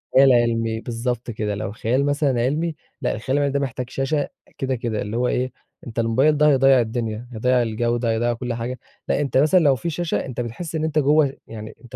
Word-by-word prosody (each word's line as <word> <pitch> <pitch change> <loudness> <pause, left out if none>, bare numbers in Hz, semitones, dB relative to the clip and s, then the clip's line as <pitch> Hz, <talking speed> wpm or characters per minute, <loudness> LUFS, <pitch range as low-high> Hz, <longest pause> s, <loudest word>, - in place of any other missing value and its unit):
خيال 135 0 +7
علمي 115 -1 +1
بالضبط 120 0 -3
كده، 105 -1 -2
لو 100 -1 -4
خيال 125 +6 0
مثلًا 145 -4 +1
علمي، 155 +6 0 0.3
لأ - - 0
الخيال 130 +5 -1
العلمي 140 -1 +1
ده 140 - +1
محتاج 125 -2 -3
شاشة 140 +2 -1 0.3
كده، 135 -1 -1
كده، 115 -3 -2
اللي 105 +3 -3
هو 125 0 +1
إيه 125 +1 0 0.4
أنت 115 0 -4
الموبايل 130 +7 +3
ده 150 - +5
هيضيّع 135 -1 +5
الدنيا، 115 0 -3
هيضيّع 125 +2 +2
الجودة 120 +1 0
هيضيّع 120 +2 +1
كلّ 120 0 -4
حاجة، 120 +2 -4 0.3
لأ - - +1
أنت 140 -2 0
مثلًا 155 +6 +5
لو 145 -5 +4
في 170 +6 -3
شاشة 170 +1 -2
أنت 125 -2 -4
بتحس 150 +8 -5
إن 155 - -1
أنت 155 -1 +1
جوّه 145 -1 +3
يعني 110 -1 -8
أنت 115 -4 -11
125 Hz, 210 wpm, -22 LUFS, 115-140 Hz, 0.4 s, خيال